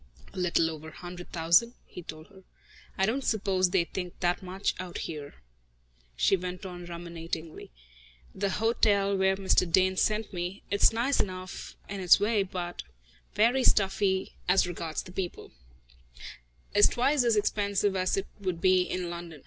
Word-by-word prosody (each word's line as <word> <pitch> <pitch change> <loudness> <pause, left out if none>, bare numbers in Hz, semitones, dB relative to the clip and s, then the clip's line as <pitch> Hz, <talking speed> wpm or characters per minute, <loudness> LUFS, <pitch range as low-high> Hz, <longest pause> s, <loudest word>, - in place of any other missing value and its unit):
"A 190 - -6
little 170 -2 +2
over 160 0 -9
a - - -9
hundred 175 0 -9
thousand," 170 +9 +3
he 180 - -10
told 155 -1 -9
her. 195 -2 -16 0.6
"I 190 - +3
don't 255 +7 -1
suppose 190 -5 +1
they 180 -1 +2
think 180 +1 -6
that 175 -1 0
much 190 +1 -2
out 180 -1 -5
here," 150 -3 -6 0.8
she 130 - +3
went 180 +1 -6
on 175 -1 -8
ruminatingly. 170 -2 -6 0.6
"The 200 0 -1
hotel 200 -2 +2
where 190 0 +2
Mr. 190 -3 +2
Dane 185 +1 +3
sent 215 +1 0
me 180 +3 -4
it's 200 - +5
nice 240 +5 0
enough, 185 -2 -4
in 200 - -5
its 180 0 +6
way, 210 +1 +2
but 180 -2 -4 0.5
very 245 +5 +3
stuffy 195 -2 +2 0.2
as 190 +1 +5
regards 165 -3 -4
the 180 - -12
people 185 -1 -5 1.2
is 205 - +7
twice 265 +2 +2
as 235 -2 +3
expensive 200 -1 +1
as 185 0 +1
it 195 - -1
would 185 -4 -3
be 185 +1 +4
in 180 -1 -3
London. 170 -3 -8
185 Hz, 160 wpm, -28 LUFS, 175-200 Hz, 1.2 s, is